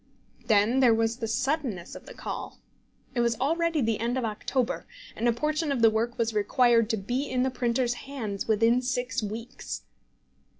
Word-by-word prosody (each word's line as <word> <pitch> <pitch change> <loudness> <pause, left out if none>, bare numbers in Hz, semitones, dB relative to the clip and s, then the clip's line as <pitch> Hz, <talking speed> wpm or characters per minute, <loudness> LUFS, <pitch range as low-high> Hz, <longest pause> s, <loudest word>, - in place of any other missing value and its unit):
Then 220 +3 +4
there 245 -4 +6
was 225 +1 0
the 230 -3 -3
suddenness 255 - -1
of - - -11
the - - -10
call. - - -6 0.6
It 245 - -1
was 235 -1 +1
already 330 +2 +1
the 225 -2 0
end 235 +3 -1
of 255 - 0
October, 235 +4 -2 0.3
and 235 - 0
a - - +5
portion 305 +5 -1
of 250 -4 0
the 225 - +7
work 230 +2 -1
was 230 -1 0
required 230 +2 +3
to 225 - +1
be 250 +8 -2
in 255 -1 +1
the 260 - 0
printer's 245 0 0 0.2
hands 220 -8 -4
within 230 +3 +3
six 250 -1 -1
weeks. 220 +3 -6
240 Hz, 180 wpm, -27 LUFS, 225-260 Hz, 0.6 s, the